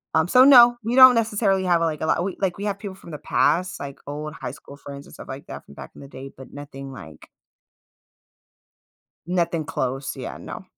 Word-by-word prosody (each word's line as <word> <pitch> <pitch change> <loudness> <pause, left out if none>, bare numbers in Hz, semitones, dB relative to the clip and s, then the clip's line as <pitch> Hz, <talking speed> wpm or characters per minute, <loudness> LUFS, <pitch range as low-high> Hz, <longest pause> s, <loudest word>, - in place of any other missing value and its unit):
um, 160 +1 +2
so 255 +6 +6
no, 240 -3 +7
we 235 +3 -2
don't 255 -2 +9
necessarily 210 -4 0
have, 170 -2 +2
like, 160 -2 -2
a - - -1
lot, 170 - +1 0.2
like, 185 -1 -1
we 200 - -6
have 200 -1 -3
people 200 -3 -8
from 170 - -15
the 150 - -6
past, 185 +2 0
like, 140 -1 -8
old 150 +1 -6
high 125 - -7
school 140 0 -14
friends 140 0 -11
and - - -16
stuff - - -12
like 135 +1 -9
that - - -10
from 70 - -16
back - - -11
in - - -13
the 140 - -11
day, 135 0 -10
but 130 - -13
nothing 135 -1 -10
like - - -13 2.0
Nothing 170 -3 -1
close. 135 -2 -4
Yeah, 130 - -7
no. - - -9
165 Hz, 210 wpm, -22 LUFS, 140-200 Hz, 2.0 s, don't